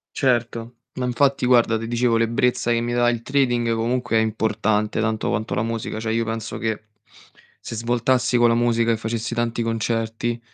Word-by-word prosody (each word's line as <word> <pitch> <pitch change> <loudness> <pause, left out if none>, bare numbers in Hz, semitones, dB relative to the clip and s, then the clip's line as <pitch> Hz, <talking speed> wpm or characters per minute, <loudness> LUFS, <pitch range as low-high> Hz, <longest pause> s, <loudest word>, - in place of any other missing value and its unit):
Certo, 120 -2 0 0.2
ma 130 - -3
infatti 135 +1 +1
guarda, 120 -2 +4
te 115 - -5
dicevo 120 0 +1
l'ebbrezza 120 +1 +1
che 115 - +1
mi 120 0 -2
dà 120 0 +3
il 120 -1 0
trading 120 -4 +1
comunque 120 +1 0
è - - +5
importante 110 -1 0
tanto 110 +1 -1
quanto 115 -2 -2
la 105 - 0
musica. 115 -1 -3
Cioè 110 0 -2
io 115 0 +1
penso 115 0 -4
che 110 -1 -2 0.8
se 115 - -7
svoltassi 120 +2 +1
con 120 0 +5
la 115 - +3
musica 115 -1 +2
e 115 - +2
facessi 115 +1 -3
tanti 120 0 -1
concerti 115 +1 -2
115 Hz, 180 wpm, -22 LUFS, 115-120 Hz, 0.8 s, è